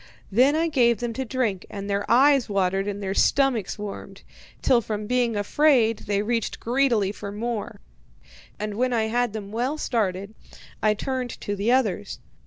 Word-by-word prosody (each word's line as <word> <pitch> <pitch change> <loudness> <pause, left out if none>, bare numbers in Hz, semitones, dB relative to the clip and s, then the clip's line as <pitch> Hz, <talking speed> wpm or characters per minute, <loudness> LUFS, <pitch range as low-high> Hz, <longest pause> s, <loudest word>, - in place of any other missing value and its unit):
Then 255 +8 +4
I 325 +1 +1
gave 240 -7 +3
them 240 -1 -3
to 265 - -3
drink, 230 -7 -1
and 200 0 -6
their 200 0 -2
eyes 270 0 +4
watered 195 0 0
and 205 0 -4
their 190 0 -2
stomachs 255 -3 +2
warmed, 205 -1 -8 0.4
till 240 -2 +4
from 210 -1 -4
being 245 0 +1
afraid 230 +1 +3
they 200 0 +1
reached 230 0 -2
greedily 235 -5 +1
for 205 -1 -7
more; 220 - -4 0.8
and 210 0 -4
when 255 +1 +1
I 220 -2 +1
had 240 -1 0
them 205 -2 -6
well 250 +7 -1
started, 200 -7 -2 0.5
I 215 -1 +3
turned 255 +2 -3
to 205 - -3
the 205 +4 0
others. 250 -7 0
225 Hz, 170 wpm, -24 LUFS, 205-250 Hz, 0.8 s, Then